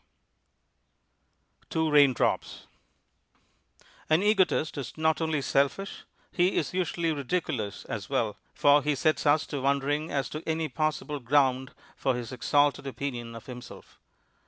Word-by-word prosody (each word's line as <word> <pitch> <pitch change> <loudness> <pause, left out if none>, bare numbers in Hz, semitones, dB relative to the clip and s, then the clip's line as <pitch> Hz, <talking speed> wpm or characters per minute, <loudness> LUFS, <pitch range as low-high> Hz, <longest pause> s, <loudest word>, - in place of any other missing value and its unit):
TWO 160 -1 0
RAINDROPS 145 -4 +3
(A - - -10
FABLE) - - -19 1.4
An 160 +4 +4
egotist 195 -6 +2
is 140 -2 -6
not 160 +1 +1
only 160 -3 0
selfish; 140 +10 0 0.3
he 180 +2 +2
is - - -1
usually 170 -2 0
ridiculous 140 - -3
as - - -5
well, - - 0 0.2
for 145 0 +5
he 150 0 0
sets 155 +2 +1
us 145 +1 +4
to 145 -3 -4
wondering 140 +3 0
as 135 -4 -1
to 155 - -5
any 160 0 0
possible 150 +1 -2
ground 130 0 +1 0.2
for 130 - 0
his 120 0 -5
exalted 140 +3 +1
opinion 120 -4 -5
of 115 - -10
himself. 125 -1 -11
145 Hz, 135 wpm, -28 LUFS, 135-160 Hz, 1.4 s, for